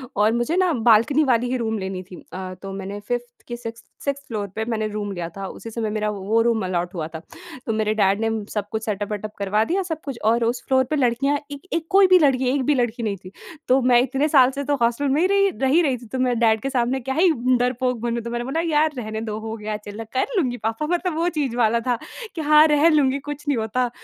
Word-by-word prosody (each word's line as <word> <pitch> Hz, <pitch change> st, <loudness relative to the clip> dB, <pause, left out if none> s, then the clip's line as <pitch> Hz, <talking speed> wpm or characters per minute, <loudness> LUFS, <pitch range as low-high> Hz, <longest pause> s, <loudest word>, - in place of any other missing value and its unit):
और 210 Hz, +2 st, +3 dB
मुझे 240 Hz, +8 st, 0 dB
ना 370 Hz, -2 st, +3 dB, 0.2 s
बाल्कनी 235 Hz, +7 st, +5 dB
वाली 245 Hz, -2 st, +2 dB
ही 255 Hz, -, +1 dB
रूम 220 Hz, -2 st, -2 dB
लेनी 190 Hz, -1 st, -4 dB
थी। 180 Hz, -, -12 dB, 0.2 s
अ, 185 Hz, 0 st, -5 dB
तो 195 Hz, 0 st, -7 dB
मैंने, 195 Hz, +1 st, -6 dB
5th 245 Hz, +4 st, -3 dB, 0.2 s
कि 240 Hz, -, -4 dB
6th 230 Hz, -1 st, -8 dB, 0.2 s
6th 280 Hz, 0 st, -3 dB
फ्लोर 210 Hz, -3 st, -3 dB
पे 220 Hz, -, -1 dB
मैंने 215 Hz, -1 st, -1 dB
रूम 205 Hz, -1 st, -4 dB
लिया 175 Hz, -3 st, -4 dB
था, 195 Hz, -, -4 dB
उसी 225 Hz, -, -9 dB
समय 220 Hz, -1 st, -2 dB
मेरा 215 Hz, 0 st, -1 dB
वो 210 Hz, +2 st, 0 dB
रूम 230 Hz, -3 st, +1 dB
अलॉट 180 Hz, 0 st, -2 dB
हुआ 160 Hz, -3 st, -3 dB
था। 160 Hz, -, -5 dB, 0.5 s
तो 225 Hz, -, -1 dB
मेरे 215 Hz, 0 st, 0 dB
डैड 200 Hz, -1 st, +2 dB
ने 225 Hz, -, +1 dB, 0.2 s
सब 205 Hz, -2 st, -2 dB
कुछ 220 Hz, 0 st, -3 dB
सेटअप 205 Hz, -1 st, -3 dB
वेटअप 210 Hz, +1 st, -4 dB
करवा 205 Hz, +2 st, +1 dB
दिया 380 Hz, +7 st, 0 dB
सब 320 Hz, -3 st, -5 dB
कुछ, 270 Hz, -5 st, -5 dB
और 230 Hz, +1 st, +3 dB
उस 240 Hz, +1 st, -1 dB
फ्लोर 260 Hz, -1 st, +4 dB
पे 310 Hz, -, 0 dB
लड़कियाँ 275 Hz, +1 st, +1 dB
एक 285 Hz, -1 st, -7 dB
एक 330 Hz, -1 st, -1 dB
कोई 390 Hz, -1 st, +6 dB
भी 370 Hz, 0 st, +6 dB
लड़की 265 Hz, -4 st, +3 dB
एक 275 Hz, -1 st, 0 dB
भी 295 Hz, -, +3 dB
लड़की 240 Hz, -1 st, -1 dB
नहीं 205 Hz, -3 st, -1 dB
थी। 185 Hz, -, -9 dB, 0.4 s
तो 260 Hz, +1 st, +4 dB
मैं 245 Hz, -1 st, +5 dB
इतने 270 Hz, +4 st, 0 dB
साल 265 Hz, -4 st, +5 dB
से 280 Hz, +1 st, -4 dB
तो 285 Hz, +1 st, +1 dB
हॉस्टल 235 Hz, +5 st, +1 dB
में 290 Hz, +4 st, +2 dB
ही 365 Hz, -, +4 dB
रही 395 Hz, 0 st, +3 dB
रह 270 Hz, -7 st, -2 dB
ही 305 Hz, +6 st, +4 dB
रही 275 Hz, -6 st, +1 dB
थी, 240 Hz, -, -13 dB
तो 255 Hz, +4 st, -5 dB
मैं 250 Hz, -1 st, +1 dB
डैड 220 Hz, -2 st, +3 dB
के 270 Hz, -, -2 dB
सामने 255 Hz, 0 st, 0 dB
क्या 265 Hz, +1 st, -4 dB
ही 340 Hz, +2 st, +4 dB, 0.3 s
डरपोक 250 Hz, 0 st, 0 dB
बनूँ। 235 Hz, 0 st, -1 dB
तो 235 Hz, -, -5 dB
मैंने 240 Hz, 0 st, -2 dB
बोला, 275 Hz, +5 st, -2 dB
"यार, 305 Hz, +1 st, +3 dB
रहने 220 Hz, -2 st, -4 dB
दो, 215 Hz, -2 st, -4 dB
हो 220 Hz, 0 st, -5 dB
गया 215 Hz, 0 st, -4 dB
चलो, 210 Hz, +1 st, -8 dB
कर 260 Hz, -, +1 dB
लूँगी 255 Hz, -9 st, 0 dB
पापा।" 225 Hz, +5 st, -2 dB
मतलब 350 Hz, 0 st, -1 dB
वो 335 Hz, +2 st, +1 dB
चीज़ 270 Hz, -6 st, -1 dB
वाला 235 Hz, -1 st, +3 dB
था 245 Hz, -1 st, +2 dB, 0.4 s
कि 320 Hz, -, -3 dB
हाँ, 300 Hz, +1 st, +6 dB
रह 300 Hz, +1 st, +4 dB
लूँगी, 280 Hz, -3 st, +3 dB
कुछ 290 Hz, +1 st, -8 dB
नहीं 285 Hz, -3 st, +1 dB
होता। 230 Hz, +3 st, 0 dB
240 Hz, 260 wpm, -22 LUFS, 215-280 Hz, 0.5 s, कोई